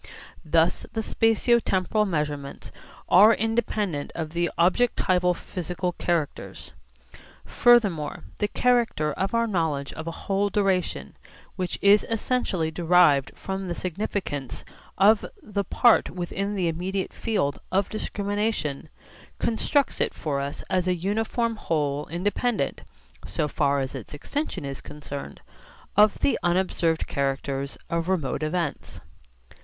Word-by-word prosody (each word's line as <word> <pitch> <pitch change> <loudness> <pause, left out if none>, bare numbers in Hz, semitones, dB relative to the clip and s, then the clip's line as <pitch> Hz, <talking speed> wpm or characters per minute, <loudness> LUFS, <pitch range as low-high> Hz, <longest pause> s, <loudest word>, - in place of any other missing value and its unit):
Thus 165 +2 +2
the 225 - -1
spatio 225 +2 +3
temporal 210 +3 +1
measurements 150 -5 -3 0.4
are 210 +5 +7
independent 215 -8 -1
of 160 -2 -4
the 170 +1 0
objectival 180 -2 +2
physical 180 +1 -4
characters. 170 -3 -3 0.7
Furthermore 205 -11 +3 0.2
the 210 - +1
character 230 - +1
of 195 +7 -2
our 230 0 +3
knowledge 160 -9 -1
of 160 +1 -7
a 165 - -7
whole 200 +1 +1
duration, 195 -3 0 0.4
which 180 -2 -2
is 200 +1 +6
essentially 220 -8 0
derived 165 -5 +4
from 190 0 -4
the 175 - -3
significance 180 - -4 0.3
of 205 +3 +5 0.2
the 200 -1 -2
part 235 +4 +4
within 195 +3 -3
the 185 -3 0
immediate 185 +4 -2
field 170 -11 -1
of 195 +1 +2
discrimination, 205 -8 -2 0.5
constructs 275 +5 +1
it - - 0
for 145 -3 -2
us 140 +1 -4
as 185 -1 0
a 180 - +2
uniform 225 +5 -1
whole 150 -6 -1
independent, 205 - -1 0.4
so 150 - -1
far 140 -1 +1
as 135 -1 -3
its - - -8
extension 195 - -4
is 135 -1 -5
concerned, 145 - -8 0.5
of 210 0 +5
the - - +2
unobserved 175 -2 +1
characters 140 0 -2
of 170 +1 -2
remote 160 -9 -1
events. 160 0 -3
180 Hz, 125 wpm, -25 LUFS, 155-210 Hz, 0.7 s, are